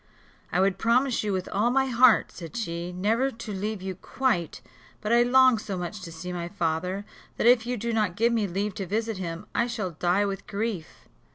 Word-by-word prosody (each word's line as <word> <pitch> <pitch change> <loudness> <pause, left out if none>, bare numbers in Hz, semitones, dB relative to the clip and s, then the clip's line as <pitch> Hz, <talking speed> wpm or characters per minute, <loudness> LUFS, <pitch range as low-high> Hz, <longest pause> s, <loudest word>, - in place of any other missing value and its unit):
"I 180 - +1
would 190 0 +2
promise 245 +3 +2
you, 210 - -1
with 185 -1 -2
all 210 +4 +1
my 265 +2 +3
heart," 250 -2 +5
said 165 +2 -9
she, 170 -5 -3
"never 220 +9 +1
to 225 -4 -7
leave 200 0 -3
you 190 0 -3
quite; 195 - -1 0.4
but 215 +2 -1
I 240 - +6
long 255 -1 +5
so 200 -3 -4
much 180 +3 -5
to 170 -2 -8
see 170 +3 -6
my 170 -1 -3
father, 180 +2 -2 0.3
that - - 0
if 240 -1 +5
you 250 0 -1
do 230 +2 -2
not 210 -5 +1
give 235 +2 +2
me 220 -3 +1
leave 200 +3 -2
to 190 - -3
visit 220 +2 -1
him 170 +1 -5
I 235 - +1
shall 220 -7 -3
die 175 +5 +1
with 195 -1 -4
grief." 200 -5 -4
205 Hz, 210 wpm, -26 LUFS, 180-235 Hz, 0.4 s, I